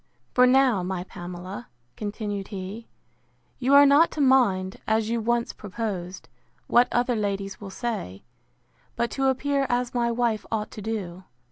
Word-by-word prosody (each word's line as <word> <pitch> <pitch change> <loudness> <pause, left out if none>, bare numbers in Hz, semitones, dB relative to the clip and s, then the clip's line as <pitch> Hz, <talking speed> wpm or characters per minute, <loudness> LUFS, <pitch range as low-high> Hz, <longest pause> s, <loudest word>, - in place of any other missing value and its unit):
For 250 0 +6
now, 255 -6 +4
my 180 0 -3
Pamela, 175 -7 -8 0.3
continued 205 -2 -4
he, 200 +3 -7 0.7
you 265 +2 +3
are 285 0 +9
not 285 +4 +6
to - - -6
mind, 235 -9 +3
as 220 0 +1
you 235 -1 0
once 235 +1 0
proposed, 190 -3 -5 0.4
what 245 +1 +4
other 245 0 +1
ladies 200 -2 -3
will 200 - -7
say; 190 - -4 0.7
but 235 0 -1
to 270 -1 0
appear 275 +1 +1
as 245 0 0
my 240 -1 +1
wife 235 -2 0
ought 215 -1 -2
to 215 - -8
do. 190 -4 -5
220 Hz, 150 wpm, -25 LUFS, 190-245 Hz, 0.7 s, are